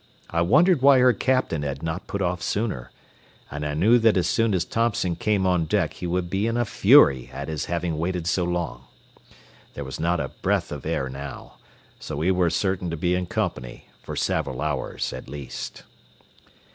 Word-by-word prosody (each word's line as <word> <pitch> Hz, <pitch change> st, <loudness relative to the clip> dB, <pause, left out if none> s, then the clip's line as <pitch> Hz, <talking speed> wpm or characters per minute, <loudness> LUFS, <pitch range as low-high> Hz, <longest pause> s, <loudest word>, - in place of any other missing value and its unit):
I 85 Hz, -, +1 dB
wondered 155 Hz, -, +4 dB
why 140 Hz, 0 st, +7 dB
her 125 Hz, -1 st, +5 dB
captain 130 Hz, -, 0 dB
had 70 Hz, 0 st, -4 dB
not 80 Hz, +3 st, -4 dB
put 100 Hz, -1 st, -2 dB
off 90 Hz, 0 st, -1 dB
sooner, 105 Hz, -, -2 dB, 0.6 s
and 75 Hz, +1 st, -5 dB
I 75 Hz, 0 st, -2 dB
knew 110 Hz, +10 st, +4 dB
that 115 Hz, -3 st, +4 dB
as 90 Hz, -, +2 dB
soon 115 Hz, -3 st, +2 dB
as 85 Hz, -2 st, 0 dB
Thompson 110 Hz, -6 st, 0 dB
came 105 Hz, -1 st, 0 dB
on 90 Hz, -3 st, +2 dB
deck -, -, 0 dB
he 90 Hz, -, -6 dB
would 90 Hz, 0 st, -1 dB
be 95 Hz, +5 st, -1 dB
in 115 Hz, +1 st, -1 dB
a 120 Hz, -, +1 dB
fury 65 Hz, -, +5 dB
at 70 Hz, +1 st, -6 dB
his 75 Hz, -2 st, -3 dB
having 85 Hz, -2 st, -2 dB
waited 90 Hz, 0 st, -2 dB
so 90 Hz, +2 st, +1 dB
long. 85 Hz, -8 st, -3 dB, 0.9 s
There 70 Hz, -, -5 dB
was 65 Hz, -, -7 dB
not 85 Hz, +1 st, +1 dB
a -, -, -3 dB
breath -, -, -1 dB
of -, -, -6 dB
air 65 Hz, -, -1 dB
now, 70 Hz, +2 st, -8 dB, 0.4 s
so -, -, -6 dB
we 85 Hz, +5 st, +2 dB
were 90 Hz, -2 st, +2 dB
certain 95 Hz, +1 st, -1 dB
to 80 Hz, -, -4 dB
be 90 Hz, +3 st, 0 dB
in 90 Hz, 0 st, -1 dB
company 90 Hz, -, -4 dB
for -, -, -7 dB
several 65 Hz, -, -1 dB
hours 75 Hz, -2 st, -2 dB
at -, -, -8 dB
least. 70 Hz, -1 st, -7 dB
90 Hz, 195 wpm, -24 LUFS, 75-100 Hz, 0.9 s, why